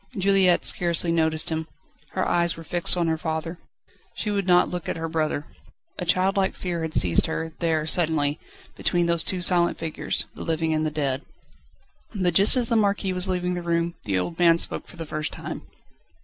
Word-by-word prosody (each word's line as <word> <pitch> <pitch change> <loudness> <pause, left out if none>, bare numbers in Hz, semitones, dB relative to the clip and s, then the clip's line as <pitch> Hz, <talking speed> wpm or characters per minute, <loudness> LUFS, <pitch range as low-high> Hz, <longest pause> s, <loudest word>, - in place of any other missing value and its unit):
Juliette 190 -2 +3
scarcely 170 -1 +1
noticed 160 -1 +1
him. 160 0 -2 0.5
Her 185 - 0
eyes 170 -1 +2
were 165 - -8
fixed 175 +2 +1
on 175 - +1
her 160 -1 0
father. 160 +1 -4 0.6
She 210 - -2
would 200 -2 -1
not 180 -1 +5
look 180 -2 -5
at - - -2
her 165 0 -3
brother. 155 -2 -1 0.5
A 180 - -2
childlike 190 +2 +2
fear 175 -2 -3
had 160 -1 -2
seized 85 -2 +3
her, 160 0 -4
there, 160 -3 0
suddenly, 155 -3 +1 0.4
between 175 -1 +1
these 170 -1 +2
two 180 -2 -1
silent 175 -1 +3
figures: 160 -1 -2
the - - -10
living 160 -1 0
and 155 0 0
the - - 0
dead. 140 -3 -2 0.9
But 180 -3 +1
just 200 +9 +6
as 245 -2 +2
the 230 - +1
Marquis 200 -3 +1
was 180 +1 -1
leaving 180 -1 -1
the 175 - -3
room, 170 0 0
the 95 -3 0
old 165 - -3
man 170 -1 +5
spoke - - -3
for - - -13
the 165 - -5
first 155 0 -3
time. - - -7
170 Hz, 195 wpm, -24 LUFS, 160-180 Hz, 0.9 s, just